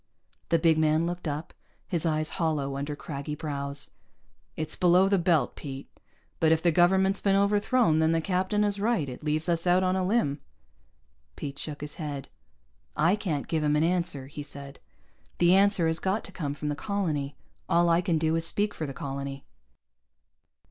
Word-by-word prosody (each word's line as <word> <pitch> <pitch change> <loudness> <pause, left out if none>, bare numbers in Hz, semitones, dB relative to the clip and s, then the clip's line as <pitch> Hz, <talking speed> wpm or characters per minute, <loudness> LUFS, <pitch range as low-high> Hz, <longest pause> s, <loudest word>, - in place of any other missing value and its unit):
The 165 - +4
big 160 -1 +3
man 155 +1 +3
looked 175 0 -4
up, 150 +2 -4 0.3
his 170 -2 0
eyes 155 -1 0
hollow 145 -4 0
under 145 +2 -3
craggy 145 0 -5
brows. 140 -2 -4 0.6
"It's 155 0 -4
below 180 +2 +4
the 195 -1 +3
belt, 165 -7 +2
Pete. 135 -2 -8 0.5
But 160 -1 +4
if 160 - +4
the 170 - +4
government's 190 +3 +3
been 195 -1 +3
overthrown, 205 -2 +3
then 160 0 +3
the 165 - +2
captain 185 +4 0
is 205 -1 0
right. 215 -8 +1
It 125 +3 -8
leaves 155 +2 0
us 170 0 0
out 180 +1 +4
on 185 0 +2
a 190 - 0
limb." 180 -9 +1 0.9
Pete 140 0 -6
shook 150 -2 -6
his 150 0 -7
head. 145 -3 -5 0.7
"I 165 +6 +4
can't 170 -9 -3
give 160 -2 0
him 150 0 +2
an 150 - +3
answer," 170 -5 0
he 145 +2 -8
said. 140 -1 -10 0.6
"The 175 +1 +5
answer 195 -2 +4
has 160 0 +1
got 195 +3 -1
to - - -9
come 145 -6 -4
from 150 +1 -4
the 145 - -1
colony. 150 -7 -2 0.3
All 170 0 +4
I 170 +1 +4
can 175 -2 +1
do 160 +1 +1
is 165 - +1
speak 205 +5 0
for 155 - -4
the 135 - -7
colony." 140 0 -5
160 Hz, 185 wpm, -27 LUFS, 145-185 Hz, 0.9 s, The